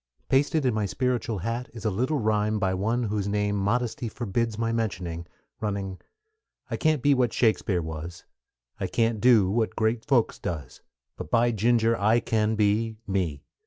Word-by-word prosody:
Pasted 145 +2 +2
in 125 - +2
my 105 -2 0
spiritual 120 -1 -1
hat 115 +6 -3
is 115 - -8
a 110 - +2
little 130 +10 0
rime 105 -2 +1
by 95 -3 0
one 110 +6 0
whose 105 -2 -1
name 105 0 0
modesty 115 +4 -1
forbids 115 0 -2
my 115 0 0
mentioning, 90 -7 -3 0.3
running: 100 -3 -3 0.7
I - - -1
can't 155 -4 +1
be 145 - +5
what 125 -4 +2
Shakespeare 105 -6 +1
was, 80 +2 -7 0.6
I - - -1
can't 115 -2 0
do 110 -7 +5
what 110 +1 0
great 110 0 0
folks 125 -5 +1
does; 75 -7 -5 0.4
But, - - -7
by 120 +5 +3
Ginger, 115 +1 +2
I 110 +3 +4
can 110 -1 0
be 110 +1 +1
ME! 90 -8 -2
110 Hz, 165 wpm, -26 LUFS, 100-120 Hz, 0.7 s, be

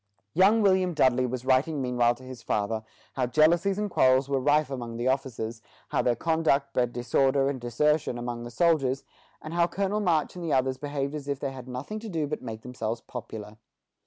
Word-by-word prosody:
Young 205 +5 +5
William 185 -3 +3
Dudley 130 -2 +3
was 125 0 -5
writing 135 +4 +2
meanwhile 125 -2 +2
to 130 - -16
his 130 -2 -9
father 110 0 -1 0.3
how 130 -2 0
jealousies 170 +8 +3
and 210 0 -1
quarrels 130 -7 +3
were 140 -1 0
rife 145 +2 +2
among 120 -3 -5
the 120 +2 -1
officers, 120 -4 -2 0.3
how - - +1
their 120 - +2
conduct 150 -1 +1
bred 125 -1 +1
disorder 135 +3 +2
and 130 -3 -6
desertion 140 +2 +1
among 120 0 -4
the 120 - -6
soldiers, 135 -1 +2 0.4
and 155 - -6
how 170 0 +3
Colonel 200 +4 -1
March 170 -7 +1
and 170 -3 -4
others 130 -1 +1
behaved 145 -1 -3
as 145 -2 -6
if 140 -1 -2
they 140 -1 -3
had 130 -1 -9
nothing 130 +13 -5
to 220 0 -7
do 160 -5 -1
but 150 +1 -4
make 110 -1 -7
themselves 115 -2 -4
popular. 110 -3 -8
135 Hz, 195 wpm, -27 LUFS, 120-155 Hz, 0.4 s, Young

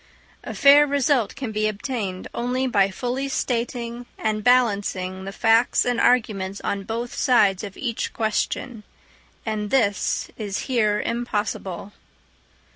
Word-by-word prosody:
A - - -6
fair 290 +1 +7
result 275 -4 +1
can 260 -5 -5
be 215 0 0
obtained 205 -3 -4
only 250 +2 -1
by 200 -6 +3
fully 250 +7 -3
stating 240 -1 -3
and 215 -1 -1
balancing 200 -6 +1
the 195 - -5
facts 225 +3 +3
and 245 -1 0
arguments 200 -5 +1
on 200 -1 -3
both 235 +3 -4
sides 205 -7 +3
of 200 -2 -8
each 235 -4 -3
question; 220 +1 -2 0.6
and 215 -2 -2
this 205 -7 0
is 205 -2 -3
here 215 -5 +1
impossible. 210 -5 -3
225 Hz, 125 wpm, -23 LUFS, 205-245 Hz, 0.6 s, fair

